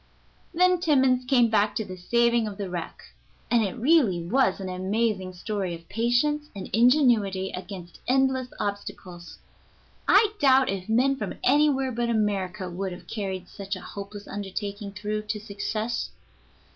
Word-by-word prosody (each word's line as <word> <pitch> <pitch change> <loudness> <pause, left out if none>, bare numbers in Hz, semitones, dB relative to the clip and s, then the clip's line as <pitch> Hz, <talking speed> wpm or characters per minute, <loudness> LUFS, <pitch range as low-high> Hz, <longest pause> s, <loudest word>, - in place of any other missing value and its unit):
] - - -35
Then 365 +1 +4
Timmans 265 -6 +3
came 245 -3 +4
back 210 -1 +2
to 220 - -2
the 185 - -7
saving 235 +4 +2
of 200 -2 -7
the 195 -3 -5
wreck, 175 -2 -6 0.5
and 235 -1 +4
it 200 - -2
really 250 - +3
was 205 0 +2
an 190 - -5
amazing 190 +1 -1
story 190 -1 -3
of 165 0 -14
patience 255 +7 +1
and 195 - -7
ingenuity 225 -6 +3
against 180 -2 -8
endless 260 0 +2
obstacles. 195 -4 -6 0.7
I 420 +1 +5
doubt 265 -3 +5
if 195 0 -4
men 260 +5 +3
from - - -4
anywhere 270 -1 +3
but 235 0 -1
America 200 -4 -1
would 185 +1 -4
have 180 - -11
carried 190 -4 -4
such 200 0 -5
a - - -7
hopeless 200 0 -8
undertaking 200 +1 -5
through 210 +1 -3
to 210 - -2
success. 215 +2 -3
210 Hz, 155 wpm, -26 LUFS, 190-250 Hz, 0.7 s, I